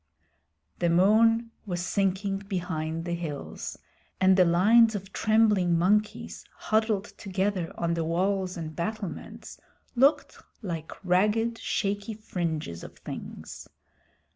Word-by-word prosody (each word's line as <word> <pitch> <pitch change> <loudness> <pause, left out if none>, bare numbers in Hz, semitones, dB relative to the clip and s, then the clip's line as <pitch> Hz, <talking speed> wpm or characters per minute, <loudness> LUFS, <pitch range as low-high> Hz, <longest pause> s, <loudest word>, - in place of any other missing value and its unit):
The 175 - +2
moon 225 +6 +4 0.2
was 175 -2 -2
sinking 195 +1 0
behind 165 -4 -3
the 175 - -2
hills 165 -4 -5 0.4
and 190 0 +5
the 185 -1 +5
lines 215 +7 +5
of 195 0 -6
trembling 210 -6 +3
monkeys 210 +5 0
huddled 215 -2 0
together 190 -2 -1
on 170 0 0
the 165 -1 -1
walls 185 +3 0
and 155 -2 -6
battlements 200 +3 -5 0.4
looked 275 +5 +3 0.2
like 165 -5 -5
ragged 215 +6 +2
shaky 205 +2 -2
fringes 160 - -4
of - - -11
things. - - -8
190 Hz, 115 wpm, -27 LUFS, 170-210 Hz, 0.4 s, and